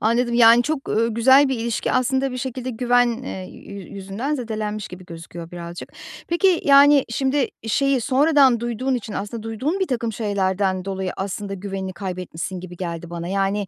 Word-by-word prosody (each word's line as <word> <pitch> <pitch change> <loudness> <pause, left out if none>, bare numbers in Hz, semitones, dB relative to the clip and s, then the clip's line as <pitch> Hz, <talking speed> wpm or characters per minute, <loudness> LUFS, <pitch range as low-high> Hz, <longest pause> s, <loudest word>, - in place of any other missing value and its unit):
anladım. 235 +2 +1
Yani, 235 0 +7
çok, 300 0 -3
ııı, 230 +2 +1
güzel 265 +4 +6
bir 265 - 0
ilişki 230 -1 -1
aslında 260 +1 +1
bir - - -4
şekilde 255 0 -4
güven, 245 0 +1
eee, 185 -7 -6
yü 200 -2 -10
yüzünden 200 +9 -3
zedelenmiş 215 -4 -4
gibi 185 0 -11
gözüküyor 165 0 -9
birazcık. 175 0 -8 0.4
Peki, 345 +1 +3
yani, 280 0 +7
şimdi 265 +2 0 0.2
şeyi 275 +2 +2
sonradan 270 -1 +4
duyduğun 240 +3 -1
için 225 -3 -4
aslında, 210 +3 -5
duyduğun 260 - -2
birtakım 235 -10 -1
şeylerden 190 -3 -1
dolayı 190 -1 -3
aslında 195 +1 -4
güvenini 190 -1 -5
kaybetmişsin 180 -1 -5
gibi 180 -1 -10
geldi 170 -1 -5
bana. 170 0 -5
Yani, 195 +1 0
225 Hz, 160 wpm, -22 LUFS, 190-260 Hz, 0.4 s, Yani